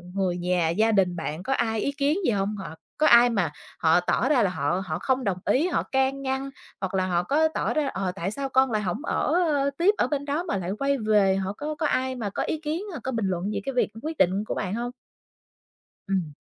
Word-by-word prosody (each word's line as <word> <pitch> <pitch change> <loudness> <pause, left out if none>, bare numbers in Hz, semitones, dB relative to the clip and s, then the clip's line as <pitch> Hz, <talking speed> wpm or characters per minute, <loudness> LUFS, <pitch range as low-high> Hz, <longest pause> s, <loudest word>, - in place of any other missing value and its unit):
người 185 -2 0
nhà 175 -2 +1
gia 215 +7 +2
đình 185 -4 +2
bạn 160 +1 -4
có 270 - 0
ai 225 -3 0
ý 280 - 0
kiến 285 +3 +1
gì 240 - +3
hông? 200 +1 -1
Hoặc 160 -5 -8 0.2
có 310 - +4
ai 240 +1 +7
mà 200 -9 0 0.3
họ 165 +1 +4
tỏ 215 +8 +1
ra 260 -7 +4
là 190 - +2
họ 175 +2 -1
họ 155 -3 -3
không 260 -1 0
đồng 195 -5 0
ý, 300 +7 +2
họ 365 - 0
can 265 +1 0
ngăn, 265 0 -2 0.3
hoặc 190 0 -3
là 185 -1 +1
họ 175 -1 +1
có 305 - +3
tỏ 315 - -2
ra, 300 -2 +1
"Ờ, 190 -7 -2
tại 195 +1 -3
sao 275 +2 -3
con 265 -1 +3
lại 215 -1 0
hổng 195 - -3
ở, 310 - 0
ơ, 285 -3 +1
tiếp 380 +5 +4
ở - - +2
bên 285 -1 -2
đó 295 +4 -1
mà 210 - -2
lại 185 0 -3
quay 275 0 +1
về?" 210 -4 +3
họ 195 +1 -2
có 300 +6 -5
có 310 - -2
ai 260 -1 0
mà 220 -5 -3
có - - -2
ý 315 - -2
kiến 320 +4 -3
hoặc 315 - -6
có 260 - -2
bình 225 -4 -1
luận 185 +3 -2
gì 200 - -2
cái 270 - -2
việc 250 - +1
quyết 315 0 -4
định 190 +3 +2
của - - -2
bạn 190 -2 -2
hông? 240 +2 -3 1.2
Ừm. 185 -6 -1
220 Hz, 255 wpm, -25 LUFS, 185-275 Hz, 1.2 s, ai